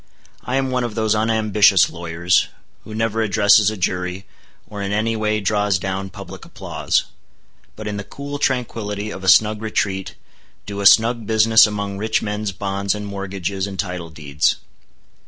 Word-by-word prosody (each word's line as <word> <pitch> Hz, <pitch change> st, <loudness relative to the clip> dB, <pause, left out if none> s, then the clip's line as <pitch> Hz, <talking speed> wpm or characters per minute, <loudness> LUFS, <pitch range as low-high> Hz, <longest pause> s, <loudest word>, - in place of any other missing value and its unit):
I 125 Hz, -, -3 dB
am 135 Hz, -1 st, 0 dB
one 125 Hz, -1 st, 0 dB
of 120 Hz, -3 st, -4 dB
those 110 Hz, -1 st, +1 dB
unambitious 110 Hz, -3 st, +3 dB
lawyers 85 Hz, +1 st, 0 dB, 0.4 s
who 110 Hz, -, -9 dB
never 115 Hz, 0 st, 0 dB
addresses 105 Hz, 0 st, +4 dB
a 110 Hz, -, -5 dB
jury, 90 Hz, +1 st, -2 dB, 0.4 s
or 105 Hz, -1 st, -7 dB
in 100 Hz, 0 st, -3 dB
any 110 Hz, +2 st, 0 dB
way 110 Hz, 0 st, 0 dB
draws 105 Hz, -1 st, +1 dB
down 95 Hz, +1 st, -4 dB
public -, -, -10 dB
applause; -, -, -2 dB, 0.7 s
but 110 Hz, 0 st, -7 dB
in 105 Hz, -1 st, -3 dB
the 100 Hz, -, -4 dB
cool 140 Hz, +6 st, -7 dB
tranquility 110 Hz, -6 st, -2 dB
of 95 Hz, -, -8 dB
a -, -, -4 dB
snug 105 Hz, +4 st, +4 dB
retreat, 100 Hz, -3 st, -2 dB, 0.5 s
do 100 Hz, 0 st, -5 dB
a 100 Hz, -, +6 dB
snug 115 Hz, 0 st, +4 dB
business 110 Hz, 0 st, +5 dB
among 100 Hz, -1 st, -4 dB
rich 110 Hz, +1 st, 0 dB
men's 105 Hz, -1 st, -3 dB
bonds 100 Hz, +1 st, -2 dB
and 105 Hz, 0 st, -6 dB
mortgages 100 Hz, -1 st, -4 dB
and 95 Hz, -1 st, -7 dB
title 90 Hz, -3 st, -4 dB
deeds. 75 Hz, -2 st, 0 dB
105 Hz, 165 wpm, -20 LUFS, 95-110 Hz, 0.7 s, a